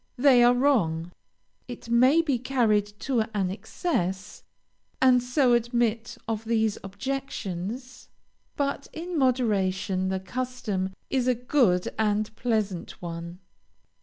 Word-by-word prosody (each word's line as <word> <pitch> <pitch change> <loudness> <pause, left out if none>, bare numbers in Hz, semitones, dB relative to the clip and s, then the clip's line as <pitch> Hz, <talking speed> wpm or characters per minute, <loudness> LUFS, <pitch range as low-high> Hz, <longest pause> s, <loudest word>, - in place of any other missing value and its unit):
They 250 -2 +6
are 245 +1 +6
wrong. 180 - +1 0.6
It 245 -2 -9
may 255 +8 +4
be 280 -6 0
carried 230 -5 +2
to 260 -4 0 0.2
an 190 -3 0
excess, 195 - -3 0.6
and 255 -1 +5
so 250 0 +2
admit 235 -1 0
of 225 -1 -2
these 220 -2 +1
objections, 225 +1 -5 0.5
but 280 -1 -2
in 345 +2 -5
moderation 205 - +1
the 190 0 -1
custom 210 -3 -3 0.2
is 255 -2 +1
a 250 - +3
good 235 -7 +2
and 215 0 0
pleasant 215 -7 -2
one. 170 +1 -7
230 Hz, 115 wpm, -26 LUFS, 195-255 Hz, 0.6 s, They